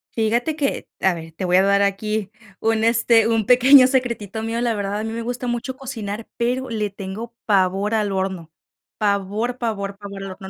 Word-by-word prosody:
Fíjate 235 +7 +1
que 285 -3 -2
A 190 - +3
ver, 165 -1 -8
te 185 - -4
voy 180 0 +3
a 190 - +6
dar 200 0 +3
aquí 205 +1 -1 0.3
un, 225 0 +1
este, 230 -1 +4
un 225 -2 +1
pequeño 255 +3 +7
secretito 235 -5 -1
mío. 225 +1 -2
La 235 -1 +1
verdad, 205 0 -2
a - - -3
mí 225 - -4
me 230 - -4
gusta 245 +2 -4
mucho 245 +2 -3
cocinar, 225 -5 -6
pero 250 +2 -1
le 215 -3 -2
tengo 200 +4 -7
pavor 195 +1 +2
al 210 -2 +1
horno. 190 -4 -3 0.5
Pavor, 210 +4 -1
pavor, 200 -4 -3
pavor 200 -1 -8
al 195 - -6
horno. 190 +1 -9
220 Hz, 195 wpm, -21 LUFS, 195-235 Hz, 0.5 s, pequeño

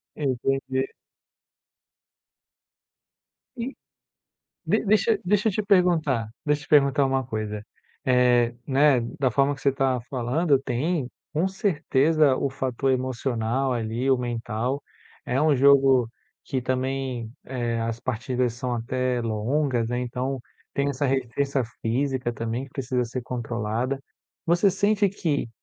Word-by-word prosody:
Entendi. 135 -1 -1 2.7
E 245 +3 -4 0.9
De - - +2
deixa 215 +1 +3
deixa 210 +4 +2
eu - - 0
te 215 - -1
perguntar, 170 - +2 0.2
deixa 150 0 +1
eu - - -13
te - - -32
perguntar 140 -1 +5
uma 135 0 +1
coisa. 110 -3 -4 0.4
Eh, 125 -2 +4
né, 140 -1 +4 0.2
da 130 -3 +3
forma 140 +3 +2
que 135 - -14
você 140 - +2
tá 130 -2 +1
falando, 140 +4 +2
tem 135 +3 -1 0.2
com 160 +4 +1
certeza 155 -6 +2
o 140 - 0
fator 135 0 -1
emocional 130 0 -1
ali, 120 +2 -1
o 130 - +5
mental, 120 +2 -2 0.4
é 125 +2 +1
um 155 -1 +4
jogo 135 -2 +5 0.4
que 130 - -2
também, 130 -2 -2
eh, 120 -3 -2
as 115 0 -2
partidas 125 0 -1
são 125 0 -3
até 125 +1 -1
longas, 115 +2 0
né, 120 +1 -1
então, 125 +2 -3 0.3
tem 140 0 +1
essa 140 0 -1
resistência 135 +1 0 0.2
física 125 +1 0
também 115 +2 -3
que 135 - -15
precisa 125 -2 -1
ser 120 +2 -5
controlada. 120 +1 -2 0.5
Você 175 +4 +4
sente 205 +2 +2
que, 160 -9 -1
130 Hz, 130 wpm, -25 LUFS, 120-145 Hz, 2.7 s, perguntar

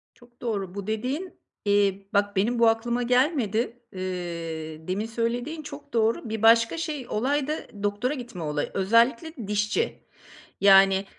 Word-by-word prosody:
Çok 240 -1 -22
doğru. 200 -6 -3
Bu 200 -1 -5
dediğin, 255 - -3 0.3
eee, 200 -1 +2
bak 205 0 +1
benim 230 +5 +1
bu 230 - +6
aklıma 235 +2 +1
gelmedi. 245 - +1
Eee, 170 -4 -5
demin 195 +4 -1
söylediğin 240 +7 -2
çok 285 - -10
doğru. 225 0 +1
Bir 220 -1 -3
başka 230 +4 +5
şey, 305 -5 -3
olay 270 +5 0
da 305 +1 -1 0.2
doktora 205 +6 0
gitme 240 - -7
olayı, 150 -1 -2
özellikle 230 - +2
dişçi. 210 - -1 0.6
Yani, 195 0 +6
225 Hz, 140 wpm, -26 LUFS, 195-245 Hz, 0.6 s, bu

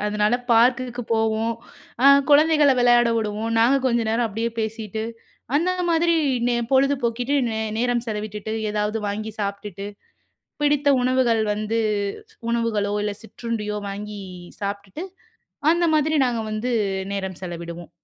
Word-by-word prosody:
அதனால 210 +2 +1 0.2
பார்க்குக்கு 245 +1 +3
போவோம். 225 +1 +1 0.5
அ - - +8 0.2
குழந்தைகள 300 -1 +6
விளையாட 240 -1 +5
விடுவோம். 215 +1 -2
நாங்க 245 +5 +5
கொஞ்ச 240 -2 +2
நேரம் 230 +1 +1
அப்படியே 225 +3 -2
பேசிட்டு, 220 0 -4 0.5
அந்த 350 +4 +2 0.2
மாதிரி 335 +1 +3 0.3
நே 240 - +1 0.2
பொழுது 275 +2 +4
போக்கிட்டு 245 +4 0
நே 220 0 -2 0.2
நேரம் 245 0 0
செலவிட்டுட்டு, 210 0 -4 0.2
ஏதாவது 210 +1 -1
வாங்கி 215 +2 -4
சாப்பிட்டுட்டு 200 -1 -4 0.8
பிடித்த 290 -1 +2
உணவுகள் 250 -3 +2
வந்து 215 +2 -2 0.7
உணவுகளோ, 220 -3 0
இல்ல 210 - -1
சிற்றுண்டியோ 220 -2 -4
வாங்கி 205 +1 -6 0.4
சாப்பிட்டுட்டு 200 - -5 0.7
அந்த 345 +1 +2
மாதிரி 310 +1 +2
நாங்க 240 -2 -1
வந்து 215 +4 -2 0.4
நேரம் 190 -2 -4
செலவிடுவோம். 170 -1 -7
225 Hz, 125 wpm, -23 LUFS, 210-245 Hz, 0.8 s, அ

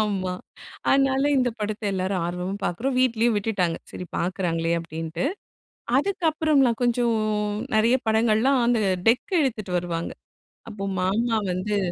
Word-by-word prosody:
ஆமா. 195 -4 -1 0.6
அதனால 270 0 +3
இந்த 250 -2 +3
படத்தை 210 0 -3
எல்லாரும் 185 -1 -1
ஆர்வமா 180 +2 -3
பார்க்கிறோம். 250 +9 -1
வீட்டிலேயும் 235 -3 +2
விட்டுட்டாங்க, 195 -5 0
சரி 180 - -7
பார்க்கிறாங்களே 170 -2 -1
அப்படின்ட்டு. 165 - -5 0.7
அதுக்கு 380 +2 -2
அப்புறம்லா 300 -5 +3
கொஞ்சம் 240 -1 +2 0.6
நிறைய 230 +4 +4
படங்கள்லாம் 225 +4 +3
அந்த 240 -2 +2 0.3
டெக் 255 - +2
எடுத்துட்டு 220 -8 -2
வருவாங்க. 170 -1 -4 0.6
அப்போ 200 -2 -7 0.2
மாமா 225 +5 +1
வந்து 205 +3 -1
215 Hz, 120 wpm, -24 LUFS, 185-245 Hz, 0.7 s, நிறைய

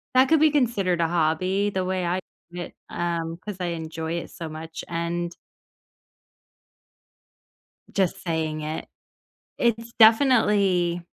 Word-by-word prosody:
that 260 +1 +6
could 320 - +5
be 315 - +6
considered 215 - +1
a 165 - +3
hobby, 175 +5 +1
the 190 -2 -2
way 185 -1 -1
I 180 +2 0 0.3
see 175 - -7
it, - - -7 0.2
um, 170 -1 -2
'cause 210 -3 -5
I 175 - -1
enjoy 160 -1 -4
it 170 - -4
so 165 -3 -7
much, 160 +1 -7
and 170 0 -2 2.6
just 190 -3 0
saying 160 -2 -2
it 155 +1 -4 0.7
It's 230 0 0
definitely 210 -7 +4
175 Hz, 130 wpm, -25 LUFS, 165-205 Hz, 2.6 s, that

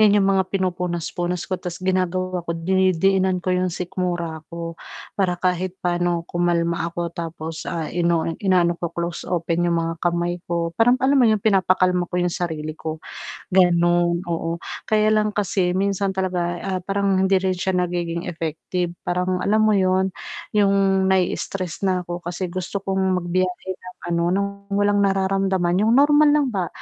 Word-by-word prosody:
'yan 210 -1 +6
yung 195 - +3
mga 190 - +3
pinupunas-punas 180 -2 -2
ko 190 - -2
'tas 180 -1 -6
ginagawa 185 -1 -1
ko 170 - -6
dinidiinan 190 +1 +2
ko 180 +1 -1
yung 180 0 0
sikmura 175 -2 -3
ko, 170 0 -5 0.4
para 180 -3 0
kahit 185 +1 -1
pa'no 175 -1 0
kumalma 170 -1 0
ako 170 0 -4
tapos, 165 -2 -5
ah, 165 -3 -3
ino-o 170 -1 +1 0.2
inaano 180 -3 +3
ko 170 0 -4
close 170 0 -4
open 170 0 0
yung 170 - +2
mga 165 0 -1
kamay 175 0 0
ko, 170 -1 -1
parang 245 +6 +4
alam 265 +2 +3
mo 255 - +6
yung 215 -2 +1
pinapakalma 185 -3 +3
ko - - -7
yung 175 -1 0
sarili 155 -4 -3
ko, 160 0 -5 0.5
ganun, 175 -1 +3
oo, 165 0 -2 0.2
kaya 215 0 +3
lang 215 -1 +2
kasi 185 -3 0
minsan 195 0 0
talaga, 180 -2 -1
ah, 190 -1 -2
parang 195 -1 +1
hindi 190 +1 +3
rin 190 -1 +1
siya 190 +1 -1
nagiging 175 -1 -2
effective 170 +1 -3
parang 180 +1 -1
alam 210 +3 +2
mo 215 -1 +4
'yun, 190 -1 +2 0.4
yung 195 -2 +3
nai-istress 185 -1 -1
na 185 -1 +2
ako 175 0 -5
kasi 175 +2 -3
gusto 185 +2 -4
kong 190 -1 +1
magbiyahe 180 +1 -2
ng 180 0 -13
ano 170 -1 0
ng 200 +1 +1 0.3
walang 205 0 +3
nararamdaman 195 -2 +1
yung 220 +2 +3
normal 295 +2 +6
lang 295 -1 +3
ba, 185 -4 -1
180 Hz, 165 wpm, -22 LUFS, 170-190 Hz, 0.5 s, yan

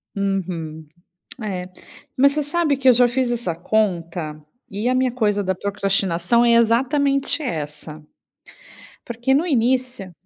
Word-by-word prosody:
Uhum. 170 -6 -3 0.6
É, 185 -3 -4 0.5
mas 280 +2 +5
você 300 - -1
sabe 300 -1 0
que 265 -1 +4
eu - - +8
já 245 +1 +5
fiz 245 0 -1
essa 230 -9 -2
conta, 170 -5 -1 0.3
e 205 +5 -3
a 255 - +1
minha 255 0 +1
coisa 210 -4 0
da 190 -1 -1
procrastinação 195 +1 +1
é 235 - +4
exatamente 275 +6 +2
essa. 155 - -5 1.0
Porque 240 +3 -1
no 305 +6 +2
início 250 - 0
225 Hz, 135 wpm, -21 LUFS, 180-255 Hz, 1.0 s, eu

